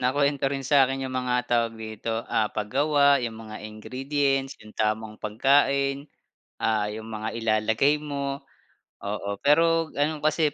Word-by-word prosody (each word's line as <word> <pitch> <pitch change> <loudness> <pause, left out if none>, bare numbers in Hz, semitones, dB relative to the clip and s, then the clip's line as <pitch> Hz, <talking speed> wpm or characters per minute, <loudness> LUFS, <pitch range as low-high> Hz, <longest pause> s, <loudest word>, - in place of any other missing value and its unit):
Nakuwento 140 +2 +1
rin 135 0 -2
sa 135 0 +5
akin 135 +1 -3
yung 130 - -6
mga 125 -1 0 0.2
tawag 115 -1 +2
dito, 110 +1 -4
ah, 110 - +2
pag-gawa 140 +6 +3
yung 120 -2 -3
mga 110 0 -8
ingredients, 135 +5 -1
yung 110 - -13
tamang 110 0 -1
pagkain. 140 +5 +2 0.6
Ah, 110 -2 +1
yung 110 +1 -7
mga 110 0 -3
ilalagay 110 +6 +2
mo. 140 -2 -4 0.6
Oo, 100 0 -3
pero 165 +2 +3
ano 150 +1 0
kasi, 155 +1 +2
135 Hz, 140 wpm, -26 LUFS, 110-140 Hz, 0.6 s, sa